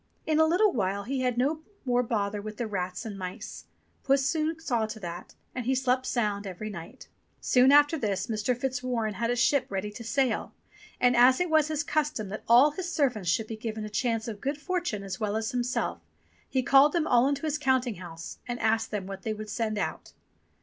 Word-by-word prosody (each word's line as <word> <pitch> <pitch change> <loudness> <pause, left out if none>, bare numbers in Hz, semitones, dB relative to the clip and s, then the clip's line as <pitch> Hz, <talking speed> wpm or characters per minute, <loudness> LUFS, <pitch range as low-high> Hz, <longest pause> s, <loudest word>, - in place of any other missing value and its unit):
In 310 0 +2
a 320 - +6
little 380 +5 +3
while 200 -2 -1
he 265 +4 -2
had 250 -2 0
no 295 +5 +1 0.2
more 245 -1 +2
bother 210 -3 -1
with 215 0 -7
the 240 - -2
rats 185 -3 -4
and 205 -3 -6
mice. 185 -1 -7 0.4
Puss 275 0 +3
soon 315 +2 0
saw 240 -8 0
to 220 0 -7
that, 175 -2 -7 0.2
and 250 -2 -4
he 265 - +2
slept 255 0 +1
sound 210 -4 -1
every 205 +3 -6
night. 175 +7 -10 0.3
Soon 255 +1 +4
after 290 +2 +5
this 200 -5 -1
Mr. 225 +2 -1
Fitzwarren 250 -4 -2
had 230 +4 -2
a 245 - +1
ship 270 +3 +2
ready 195 +1 -3
to 230 - -9
sail; 255 +1 0 0.4
and 245 0 +4
as 250 +2 +6
it 360 -2 0
was 310 -2 +4
his 310 -1 -1
custom 295 -9 -1
that 215 - -5
all 255 +6 +7
his 355 +3 -5
servants 245 - 0
should 220 +6 +1
be 225 - -6
given 220 -1 -5
a - - -6
chance 225 +1 -1
of 215 -2 -6
good 280 +2 -2
fortune 345 - -2
as 190 -1 -5
well 210 -1 -1
as 220 +3 -1
himself, 245 0 -1 0.5
he 260 -1 0
called 275 +3 +6
them 335 -3 +1
all 245 -3 +4
into 280 +1 -1
the 305 0 0
counting 260 -5 +1
house 170 -2 -9
and 240 0 -3
asked 225 0 +1
them 205 -3 -3
what 195 0 -7
they 220 - -2
would 215 0 -7
send 215 -1 -1
out. - - -4
240 Hz, 215 wpm, -28 LUFS, 210-275 Hz, 0.5 s, all